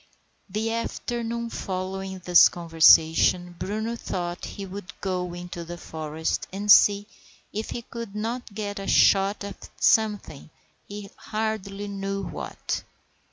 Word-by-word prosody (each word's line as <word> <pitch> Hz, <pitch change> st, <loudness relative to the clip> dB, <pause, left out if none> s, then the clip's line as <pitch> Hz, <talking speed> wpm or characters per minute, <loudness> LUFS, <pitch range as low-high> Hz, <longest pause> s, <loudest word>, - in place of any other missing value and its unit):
The 220 Hz, +3 st, -1 dB
afternoon 235 Hz, 0 st, -3 dB
following 190 Hz, 0 st, -4 dB
this 175 Hz, -1 st, +8 dB
conversation 165 Hz, +1 st, +4 dB
Bruno 220 Hz, +4 st, -2 dB
thought 175 Hz, -6 st, -4 dB
he 200 Hz, -, -7 dB
would 195 Hz, +1 st, -9 dB
go 180 Hz, -2 st, -2 dB
into 175 Hz, -1 st, -7 dB
the 175 Hz, +1 st, -7 dB
forest 160 Hz, -1 st, -3 dB
and 205 Hz, +2 st, +1 dB
see 205 Hz, 0 st, +7 dB, 0.5 s
if 215 Hz, +2 st, -3 dB
he 235 Hz, -, -5 dB
could 230 Hz, -3 st, -8 dB
not 230 Hz, +2 st, -3 dB
get 205 Hz, -1 st, -4 dB
a 195 Hz, -, -6 dB
shot 195 Hz, +1 st, +4 dB
at 200 Hz, -1 st, -8 dB
something, 210 Hz, -10 st, +2 dB, 0.4 s
he 205 Hz, 0 st, -8 dB
hardly 210 Hz, -2 st, -3 dB
knew 195 Hz, 0 st, -3 dB
what. -, -, -4 dB
195 Hz, 125 wpm, -26 LUFS, 180-215 Hz, 0.5 s, this